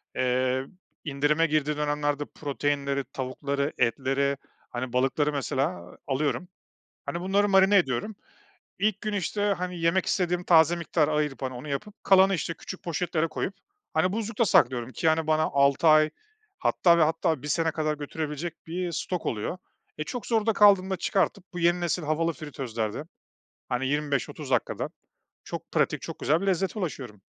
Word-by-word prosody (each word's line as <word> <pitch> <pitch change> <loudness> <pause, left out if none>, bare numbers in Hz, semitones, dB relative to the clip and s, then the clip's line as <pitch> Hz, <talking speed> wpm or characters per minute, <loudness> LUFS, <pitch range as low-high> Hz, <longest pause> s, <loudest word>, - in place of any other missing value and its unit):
eee, 130 +1 +1 0.4
indirime 150 +2 +1
girdiği 150 -1 0
dönemlerde 145 -1 -1
proteinleri, 140 -1 -2
tavukları, 140 +2 -2
etleri, 135 +4 +1 0.3
hani, 125 0 -5
balıkları, 135 +4 +2
mesela, 140 +4 -2
alıyorum. 145 +6 -1 0.6
Hani, 170 - -3
bunları 195 +3 +2
marine 195 +1 +5
ediyorum. 135 - -1 0.7
İlk 205 -1 +1
gün, 215 0 -3
işte, 205 +1 -2 0.2
hani, 180 0 -4
yemek 165 +3 +2
istediğim 180 -1 0
taze 165 -1 +5
miktarı 170 -3 0
ayırıp, 150 -3 -1
hani, 130 -1 -3
onu 125 +4 -8
yapıp, 200 +10 -5
kalanı, 195 0 +5
işte, 170 0 -3
küçük 185 - -9
poşetlere 165 -1 -1
koyup, 185 - -3 0.4
hani, 160 +3 +2
buzlukta 225 +1 0
saklıyorum 125 - +3
ki, 165 - -1
hani, 160 0 +1
bana 155 0 +3
6 140 +1 +3
ay 155 0 +6 0.5
hatta 170 -2 +4
ve 165 - +5
hatta 160 -2 +1
1 150 - -6
sene 165 +2 +1
kadar 155 -1 -1
götürebilecek 155 +3 -5
bir 175 +1 -3
stok 175 +1 -3
oluyor. 110 - -2 0.4
E, 150 - -2
çok 235 +8 -6
zorda 225 -1 +2
kaldığımda 195 -2 +5
çıkartıp 195 +2 0
bu 175 - -4
yeni 175 +1 +3
nesil 175 0 -1
havalı 160 +2 0
fritözlerde, 130 -7 -4 0.7
hani, 125 +2 -1
25-30 145 0 -2
dakikada 125 -3 0 0.6
çok - - -7
pratik, - - +1
çok - - -7
güzel 155 +5 +2
bir 195 - -3
lezzete 190 +2 0
ulaşıyorum. 130 - -5
155 Hz, 155 wpm, -27 LUFS, 140-180 Hz, 0.7 s, ay